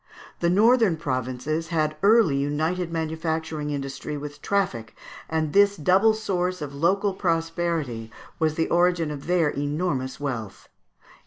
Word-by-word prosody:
The 170 - +2
northern 215 -1 +4
provinces 135 +2 -2
had 155 -3 0
early 210 -7 +5
united 160 +5 -1
manufacturing 160 -1 -2
industry 140 +1 -4
with 145 0 -8
traffic, 155 - -1 0.3
and 160 -2 -1
this 200 0 +5
double 190 +7 +4
source 185 -4 -1
of 145 -2 -6
local 190 +7 +1
prosperity 165 - -2 0.3
was 155 -1 +1
the 160 - 0
origin 175 -2 +2
of 145 0 -7
their 175 -3 +3
enormous 145 -2 -2
wealth. 120 -8 -5
160 Hz, 130 wpm, -25 LUFS, 145-180 Hz, 0.3 s, early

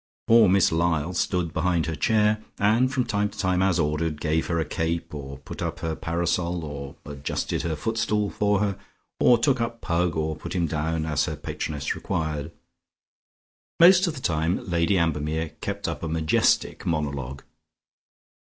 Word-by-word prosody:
Poor 115 -3 +6
Miss 95 -1 +4
Lyall 80 0 +1
stood 85 -1 -1
behind 85 -1 +1
her 80 - -2
chair, 105 +7 +2
and 115 +6 +3
from 130 -1 +1
time 105 -1 0
to - - -15
time 90 -2 +1
as 95 -2 +2
ordered, 75 -1 0
gave 80 0 0
her 85 - 0
a 80 - 0
cape, 80 +2 -2
or 70 -2 -7
put - - -9
up - - -3
her 80 -1 -2
parasol, 85 0 -1
or 70 -1 -7
adjusted 70 -1 -3
her 80 -2 -2
footstool 105 +2 -1
for 105 -1 +1
her, 100 -2 -1 0.4
or 120 - +6
took 125 +1 +2
up 115 0 -3
Pug 85 -2 0
or 80 0 -1
put 85 +2 -7
him 85 -2 +1
down 80 +1 -1
as 75 -2 +1
her 80 - -3
patroness 75 0 -3
required. 75 -1 -3 1.3
Most 180 +2 +7
of 165 - -2
the 130 - -8
time 80 +1 0
Lady 85 +2 +2
Ambermere 80 -1 0
kept - - -3
up - - -4
a 85 - -3
majestic 80 0 +1
monologue. 70 -4 -3
85 Hz, 170 wpm, -25 LUFS, 80-100 Hz, 1.3 s, Most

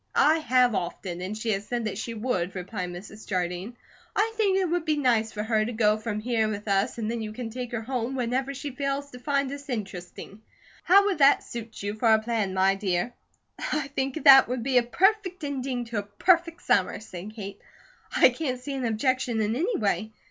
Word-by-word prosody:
"I 315 +2 +5
have, 250 -4 +3
often, 180 -1 -4
and 195 +4 -4
she 220 0 -1
has 200 0 -2
said 240 0 -2
that 205 -1 -3
she 230 +1 -4
would," 205 -6 -2
replied 185 0 -4
Mrs. 195 +5 -10
Jardine. 185 +4 -3 0.4
"I 445 +2 +1
think 405 -4 +2
it 385 - +2
would 345 0 0
be 310 -2 0
nice 230 -5 +2
for 210 - -4
her 220 -1 +1
to 235 +3 -3
go 215 -1 +3
from 215 -1 -4
here 225 -1 0
with 210 0 -5
us; 195 +2 +1
and 225 -1 -2
then 235 -1 -3
you 215 -1 -4
can 225 +1 -6
take 245 0 -5
her 230 -2 -3
home 250 +1 -2
whenever 255 +2 -1
she 280 +1 -5
fails 280 +1 -3
to 250 - -10
find 275 0 0
us 285 0 -8
interesting. 200 -2 -6 0.4
How 395 +2 +6
would 390 -6 0
that 275 0 +6
suit 225 -3 -8
you 205 0 -2
for 220 +1 +2
a 220 - +7
plan, 220 -4 -1
my 190 +1 +4
dear?" 195 +3 -1 0.5
"I 300 -2 -2
think 275 +2 -3
that 270 -2 +9
would 245 -1 -3
be 255 -1 +4
a - - +2
perfect 370 - +1
ending 265 -3 -3
to 230 -2 -3
a - - -1
perfect 335 - +1
summer," 190 -1 +2
said 210 0 -9
Kate. 200 -2 -7 0.6
"I - - +8
can't 255 -6 -3
see 280 +3 -6
an 265 -2 -2
objection 240 +1 0
in 215 +1 0
any 380 - 0
way. 215 +1 -1
235 Hz, 215 wpm, -26 LUFS, 210-275 Hz, 0.6 s, that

